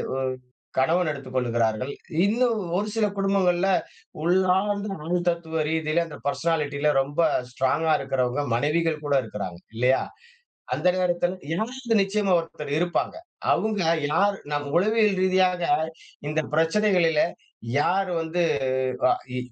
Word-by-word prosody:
ஒ - - -2 0.6
கணவன் 160 +5 +2
எடுத்துக் 135 -3 -8
கொள்கிறார்கள். 120 0 0 0.4
இன்னும் 230 +1 +2 0.2
ஒரு 210 +2 -1
சில 220 -2 +2
குடும்பங்கள்ல 195 -2 +2 0.5
உள்ளார்ந்த 190 +3 +2 0.2
அனு 175 +2 +1
தத்துவ 160 -2 -2
ரீதியில 160 +1 +1
அந்த 150 - -9
பெர்சனாலிட்டில 150 -2 0
ரொம்ப 145 +3 -5 0.3
ஸ்ட்ராங்கா 155 +5 +1
இருக்கிறவங்க, 135 0 -1
மனைவிகள் 155 +3 0
கூட 145 -1 +1
இருக்கிறாங்க. 100 -5 -6 0.2
இல்லையா? 125 +3 +3 0.7
அந்த - - 0
நேரத்தில 175 0 0 0.2
யாராவது 235 +4 -2
நிச்சயமா, 195 0 0
ஒருத்தர் 150 -3 -7
இருப்பாங்க. 175 - -1 0.4
அங்க 215 -3 0 0.3
யார் 200 +5 +3 0.2
நம் 145 0 -1
உளவியல் 210 +1 +3
ரீதியாக 185 -1 +2 0.6
இந்த 155 +1 0
பிரச்சனைகளில 165 -1 +3 0.6
யார் 190 +4 +1
வந்து, 165 +2 -1 0.7
அ - - +5 0.2
இ - - -2
170 Hz, 115 wpm, -25 LUFS, 145-195 Hz, 0.7 s, அ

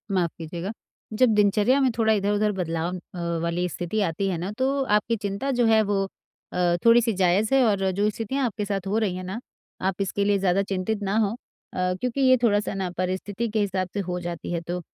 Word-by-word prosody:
माफ़ 175 -3 +1
कीजिएगा, 170 +4 -5 0.4
जब 250 +3 +4
दिनचर्या 210 +5 +3
में 260 - +4
थोड़ा 220 -1 +3
इधर-उधर 205 +1 +1
बदलाव 165 +1 -2 0.2
अ, 170 -1 -2
वाली 175 +1 0
स्थिति 180 +5 -2
आती 190 +2 -1
है 180 - -1
ना 180 +5 -4
तो 270 +1 +1
आपकी 210 -1 +1
चिंता 205 +5 -3
जो 245 -2 +2
है 220 -1 +5
वो 200 -1 0 0.5
अ, 175 -1 +2
थोड़ी-सी 230 0 +5
जायज़ 195 +5 +2
है 270 - +5
और 195 -2 +1
जो 205 +3 +1
स्थितियाँ 240 +5 -2
आपके 210 -2 -2
साथ 195 -2 -3
हो 205 - 0
रही 205 -5 0
हैं 185 - -5
ना, 190 +5 -5 0.4
आप 190 0 0
इसके 200 +1 0
लिए 205 -1 +3
ज़्यादा 190 0 +2
चिंतित 200 +2 -2
ना 200 +2 0
हो 210 -2 +2 0.4
अ, 180 0 0
क्योंकि 250 +2 -1
ये 255 -1 +6
थोड़ा-सा 205 -3 +2
ना 190 -2 -2
परिस्थिति 190 +5 -2
के 215 0 -1
हिसाब 190 -2 0
से 205 - -2
हो 180 -2 -3
जाती 175 -1 -5
है 170 - -1
तो 180 +1 -2
200 Hz, 215 wpm, -25 LUFS, 180-220 Hz, 0.5 s, ये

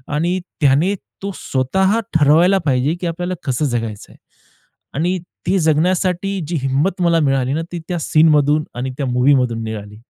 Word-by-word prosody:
आणि 175 +5 0 0.2
त्याने 145 +7 +3 0.3
तो 200 - -2
स्वतः 190 - 0
ठरवायला 160 +5 +4
पाहिजे, 135 +3 +1
की 180 - -1
आपल्याला 175 +2 -3
कसं 135 +1 -1
जगायचं 115 -5 -4
आहे - - -18 0.8
आणि 175 +5 0 0.3
ती 190 - +2
जगण्यासाठी 180 +4 +1
जी 170 - -3
हिंमत 145 +8 0
मला 170 -1 +3
मिळाली 135 -2 +1
ना, 160 - -1
ती 175 - -3
त्या 175 - -1
सीनमधून 155 -1 +3
आणि 125 +2 -3
त्या 140 - -2
मूव्हीमधून 125 -1 +2
मिळाली 105 -2 -6
150 Hz, 155 wpm, -18 LUFS, 130-175 Hz, 0.8 s, ठरवायला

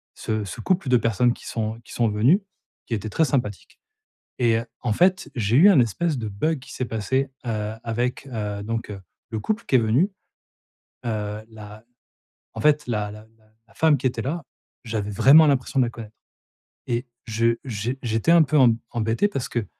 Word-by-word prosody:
ce 110 -1 -2
ce 100 - -8
couple 175 - 0
de 125 - +5
personnes 115 +1 +2
qui - - -15
sont 110 0 -3
qui - - -12
sont 115 -2 +1
venues, 125 - +3 0.5
qui - - -4
étaient 110 +1 -5
très 160 - +2
sympathiques 120 -9 -3 0.6
et 115 -2 +3
heu, 115 - -6 0.2
en 120 - -1
fait, 185 - +2
j'ai 110 -1 0
eu 185 +8 +8
un 180 -10 +6
espèce 145 - 0
de 110 - -4
bug 155 +11 -1
qui 125 - -12
s'est 130 - -3
passé, 130 +5 -1 0.2
heu, 110 -1 -2
avec, 120 +4 -2
heu, 105 -5 -4
donc, 115 +1 -4
heu, 100 - -7 0.3
le 110 - -3
couple 215 - -2
qui - - +1
est 125 - +7
venu. 120 - +2 1.0
Heu, 105 -2 -3
la 105 -1 -12 0.7
en - - -5
fait 150 0 +3
la 105 -3 -1
la 105 +1 -12
la 110 - -28 0.2
la 115 - -23
femme 160 +1 +4
qui 130 - -2
était 120 -2 -1
là, 155 +6 -3 0.4
j'avais 110 -2 -3
vraiment 140 +10 +7
l'impression 135 0 +1
de 125 - +3
la 120 - -4
connaître 110 -2 -11 0.7
et 120 +2 -1 0.2
je 115 +1 +1
j'é 120 +2 -3
j'étais 115 +7 +1
un 170 -1 +7
peu 150 +1 +1
em 120 -5 +5
embêté 115 - +1
parce 135 -10 -4
que, 120 -3 -2
115 Hz, 195 wpm, -23 LUFS, 110-135 Hz, 1.0 s, eu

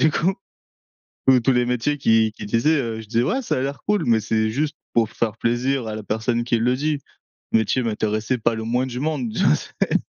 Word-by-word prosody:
du 155 - +5
coup, 185 +5 +1 0.9
tous 130 -1 +7
tous 135 - +3
les 125 0 +2
métiers 125 +4 0
qui 110 -4 +3
qu'ils 105 - -8
disaient, 150 +9 +2
heu, 115 -2 -4
je 110 - -13
disais: 115 +2 +1
«Ouais, 265 - 0
ça - - -1
a - - 0
l'air 140 +1 -3
cool», 210 -1 +2
mais 115 -2 +4
c'est 110 0 0
juste 150 +6 -1 0.2
pour 115 -2 +2
faire 110 -2 -2
plaisir 120 +1 0
à 110 - -4
la 110 - -6
personne 115 +3 -1
qui 120 -1 +1
le 125 +3 +2
dit. 150 +2 -1 0.5
Le 110 - +4
métier 120 +4 0
m'intéressait 110 +2 -1
pas 115 0 +1
le 110 - -4
moins 125 +3 0
du 125 0 -5
monde, 140 -8 -2
tu - - +1
vois? - - +5
C'est - - -1
120 Hz, 235 wpm, -22 LUFS, 110-135 Hz, 0.9 s, tous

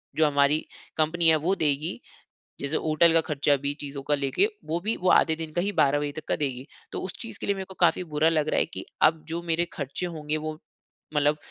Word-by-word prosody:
जो 155 -1 +4
हमारी 145 +1 +3 0.4
कंपनी 165 +2 +2
है 160 - +6
वो 195 - +3
देगी। 155 - 0 0.6
जैसे 140 +2 0
होटल 160 +1 +4
का 165 - +5
खर्चा 145 -2 +1
भी, 140 +1 -2
चीज़ों 140 -1 -6
का 145 - +1
लेके, 140 - +1 0.2
वो 165 +2 -1
भी 220 +3 -1
वो 185 - +1
आधे 160 -1 +4
दिन 160 -1 -6
का 175 - +1
ही 200 - 0
12 145 -6 +3
बजे 145 -1 -2
तक 155 +1 -8
का - - +1
देगी। 135 -3 -3 0.3
तो - - -3
उस 185 - -5
चीज 225 -3 -5
के - - -4
लिए 200 - +2
मेरे 190 - -5
को 190 - -6
काफ़ी 175 +1 +3
बुरा 155 +2 +4
लग 155 -2 +1
रहा - - +2
है - - +3
कि, - - -8 0.2
अब 160 0 +4
जो 170 +1 -3
मेरे 170 0 0
खर्चे 140 +5 -4
होंगे 155 -2 -3
वो, 155 0 -4 0.6
मतलब 150 +1 +3
155 Hz, 240 wpm, -26 LUFS, 145-170 Hz, 0.6 s, है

